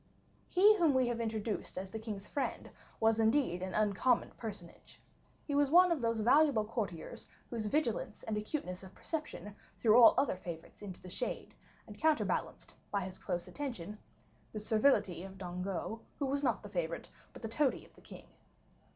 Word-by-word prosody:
He 410 +4 +6
whom 325 -7 +4
we 255 -2 +3
have 235 -1 -2
introduced 220 -3 -3
as 190 +1 -5
the 220 - -4
king's 210 -3 -6
friend 285 - -3 0.3
was 225 0 +3
indeed 220 -6 +2
an 185 0 -4
uncommon 215 +4 +2
personage; 200 -7 -9 0.5
he 290 - -3
was 285 -1 +3
one 360 +3 +7
of 320 -6 +1
those 230 -1 0
valuable 255 -1 +5
courtiers 210 -7 -5 0.2
whose 225 -3 -2
vigilance 280 -2 -1
and 220 - -2
acuteness 210 -4 -3
of 190 0 -12
perception 300 -10 -5 0.2
threw 230 +1 +6
all 230 - +9
other 280 - +2
favorites 170 -3 -9
into 195 -3 -7
the 185 - -11
shade, - - -4 0.3
and 210 -2 -12
counterbalanced, 315 -1 0 0.2
by 200 - 0
his 185 0 -7
close 175 0 -3
attention, 210 -3 -5 0.5
the 215 - -3
servility 215 -5 +2
of 190 +1 -9
Dangeau, 185 +4 -4 0.2
who 285 - -1
was 280 +1 -1
not 245 -5 +1
the 205 - -8
favorite, 170 -3 -3 0.2
but - - -13
the - - -1
toady 260 +4 0
of - - -21
the - - -19
king. - - -12
220 Hz, 175 wpm, -34 LUFS, 190-265 Hz, 0.5 s, all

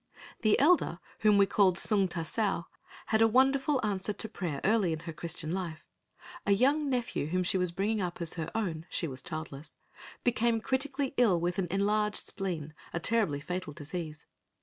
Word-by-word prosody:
The 215 -3 +4
elder 285 - +3 0.2
whom 210 -2 +5
we 200 - +6
called 195 -3 +3
Sung 200 -3 +3
ta 175 -2 -3
sao 195 0 0 0.4
had 220 0 +1
a 225 - +7
wonderful 270 +4 +3
answer 200 0 -1
to 220 - -2
prayer 175 -9 -4
early 200 -5 +3
in 160 - -5
her 165 -1 -6
Christian 165 0 -4
life. 170 -4 -4 0.6
A 200 - +3
young 280 +7 +2
nephew 245 - -1
whom 185 +3 0
she 185 +1 +1
was 180 -1 +1
bringing 205 +4 0
up 175 -2 -3
as 170 -2 0
her 165 -2 -4
own 170 -7 -2
(she 170 - -1
was 130 -2 -6
childless) 155 -3 -7 0.5
became 235 -1 +2
critically 270 +3 -1
ill 210 -8 +4
with 175 +3 -1
enlarged 205 +3 +1
spleen, 165 -6 -4 0.2
a 170 - -2
terribly 195 -7 +1
fatal 180 -1 -4
disease. 155 +1 -6
190 Hz, 175 wpm, -30 LUFS, 170-225 Hz, 0.6 s, a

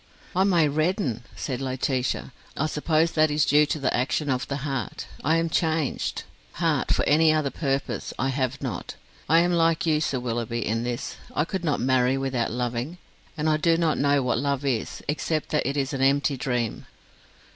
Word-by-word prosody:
"I 190 +1 +4
may 170 -6 +4
redden," 155 - 0
said 130 -1 -4
Laetitia. 130 0 -1 0.2
"I 150 - +1
suppose 155 +2 +1
that 155 0 +3
is 150 0 +2
due 150 +1 +4
to 155 - -1
the 135 -3 0
action 135 +3 0
of 130 0 -1
the 140 - -2
heart. 135 -7 -3 0.2
I 160 +3 +3
am 165 0 +1
changed. 160 -3 -1 0.3
Heart, - - 0
for - - +2
any 155 +2 +5
other 155 -3 +1
purpose, 135 -3 -2
I 135 - 0
have 135 0 -2
not. 120 -9 -4 0.3
I 165 +2 +6
am 175 +1 +2
like 165 -1 +2
you, 155 -2 +2
Sir 140 -4 0
Willoughby, 120 -1 -2
in 115 +1 0
this: 120 +2 -4 0.2
I 150 - +2
could 190 +1 -4
not 150 -4 +1
marry 130 +1 +2
without 135 -3 -1
loving, 125 +6 -3 0.4
and 150 +1 -1
I 155 -1 +3
do 165 +1 +3
not 165 -2 +1
know 140 -1 +3
what 125 -1 +1
love 140 0 -1
is, 125 -5 -2
except 155 +1 -1
that 150 -4 0
it 140 - -3
is 135 0 -1
an 135 - -2
empty 140 +1 +3
dream." 125 -3 -2
140 Hz, 190 wpm, -25 LUFS, 130-155 Hz, 0.4 s, I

